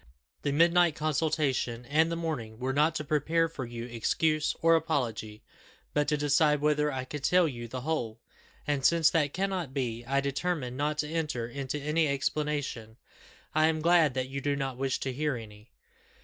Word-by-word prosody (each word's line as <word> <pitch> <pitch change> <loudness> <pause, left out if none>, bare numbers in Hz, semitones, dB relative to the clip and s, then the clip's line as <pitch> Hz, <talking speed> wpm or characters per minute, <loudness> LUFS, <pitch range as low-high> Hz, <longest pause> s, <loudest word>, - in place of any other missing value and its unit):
The 145 - -1
midnight 170 +2 +4
consultation 145 -6 0
and 160 +5 +2
the - - -1
morning, 150 -10 -4
were 130 +2 -2
not 150 +3 +2
to 150 - -2
prepare 160 +3 +1
for 150 -5 -6
you 120 0 -6
excuse 150 +6 0
or 165 0 +5
apology, 120 -9 -2 0.5
but 150 0 +1
to 150 0 +1
decide 150 +1 +3
whether 150 0 +2
I 130 -1 -4
could 145 +1 -7
tell 180 +2 +4
you 120 -5 -6
the 130 +2 -6
whole; 120 -7 -2 0.5
and 145 -2 -1
since 165 +1 +4
that 150 -4 +1
cannot 185 -6 -2
be, 120 -3 -2
I 140 +1 +2
determined 140 -1 -2
not 150 +2 -1
to - - -6
enter 150 -7 -2
into 135 +3 -4
any 150 +2 +1
explanation. 140 -5 -2 0.6
I 155 +1 +4
am 160 -1 0
glad 165 -4 +4
that 130 -1 -1
you 135 +1 -5
do 145 +1 0
not 135 -2 -3
wish 135 +1 -1
to 130 - -2
hear 150 +1 -1
any." 105 -1 -11
145 Hz, 180 wpm, -29 LUFS, 130-155 Hz, 0.6 s, or